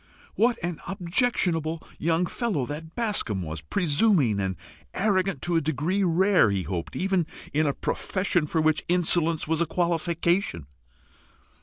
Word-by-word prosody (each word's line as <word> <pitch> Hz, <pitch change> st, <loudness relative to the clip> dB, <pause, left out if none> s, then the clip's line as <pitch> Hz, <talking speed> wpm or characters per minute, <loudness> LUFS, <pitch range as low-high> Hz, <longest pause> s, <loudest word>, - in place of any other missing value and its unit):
What 235 Hz, +2 st, +2 dB
an 175 Hz, -2 st, -3 dB
objectionable 175 Hz, -, 0 dB, 0.2 s
young 165 Hz, +2 st, +1 dB
fellow 185 Hz, -, -1 dB
that 160 Hz, +4 st, -7 dB
Bascombe 205 Hz, -, -1 dB
was! 80 Hz, 0 st, -5 dB
presuming 150 Hz, -, +2 dB
and 95 Hz, -1 st, -1 dB, 0.4 s
arrogant 190 Hz, -6 st, +1 dB
to 175 Hz, -1 st, +1 dB
a -, -, +2 dB
degree 160 Hz, +7 st, 0 dB
rare, 185 Hz, -, +4 dB
he 100 Hz, -2 st, -1 dB
hoped, 85 Hz, 0 st, -4 dB
even 190 Hz, -3 st, 0 dB, 0.3 s
in 155 Hz, +1 st, +2 dB
a 140 Hz, -, +1 dB
profession 185 Hz, -4 st, -1 dB
for 160 Hz, +1 st, 0 dB
which 155 Hz, -1 st, +2 dB
insolence 170 Hz, -2 st, +1 dB
was 160 Hz, +1 st, 0 dB
a 170 Hz, -, +1 dB
qualification. 170 Hz, -, 0 dB
170 Hz, 140 wpm, -26 LUFS, 150-185 Hz, 0.4 s, rare